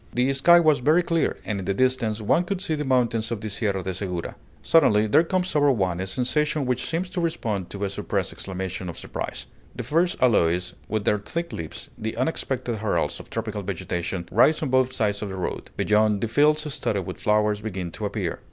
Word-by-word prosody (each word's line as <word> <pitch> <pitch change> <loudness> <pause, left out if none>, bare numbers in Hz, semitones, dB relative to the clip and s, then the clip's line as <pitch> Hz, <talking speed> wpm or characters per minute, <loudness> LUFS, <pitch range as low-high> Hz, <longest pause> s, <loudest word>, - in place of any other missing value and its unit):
The 125 +3 +2
sky 170 +6 +6
was 155 -3 +4
very 155 +8 +4
clear, 165 -1 0
and 105 -2 -2
in 95 - -5
the 100 - 0
distance 120 -3 +1
one 165 +11 +3
could 185 +1 -3
see 175 -4 -2
the 150 -1 -1
mountains 120 -4 +1
of 115 - -3
the 110 0 -5
Sierra 100 -2 -1
de 95 +1 -3
Segura. 90 -2 -4 0.3
Suddenly, 110 -10 +4
there 110 +9 +4
comes 185 0 -1
over 145 -1 +5
one 95 -7 0
a 95 - -3
sensation 145 +7 0
which 125 -1 -1
seems 170 +3 -1
to 180 - -2
respond 115 - -2
to 100 0 -5
a 100 - 0
suppressed - - -2
exclamation 95 -1 -5
of 85 - -7
surprise: - - -5 0.3
the 125 - -4
first 165 +8 +1
aloes 90 -7 +2 0.2
with 110 -1 -1
their 105 - +2
thick 170 +12 -4
leaves, 80 -2 -7
the 110 +1 -4
unexpected 130 -3 -2
heralds 110 0 -1
of - - -12
tropical 110 -2 -3
vegetation, 90 -2 -3
rise 150 +9 +4
on 145 - -1
both 130 0 +3
sides 105 -4 -1
of 105 - -3
the 95 - -5
road. 95 - -4
Beyond, 105 -1 +2
the 115 - 0
fields 150 +4 +2
studded 100 - -1
with 90 - -7
flowers 105 0 +2
begin 95 -5 -4
to - - -3
appear. - - -3
110 Hz, 210 wpm, -25 LUFS, 100-145 Hz, 0.3 s, sky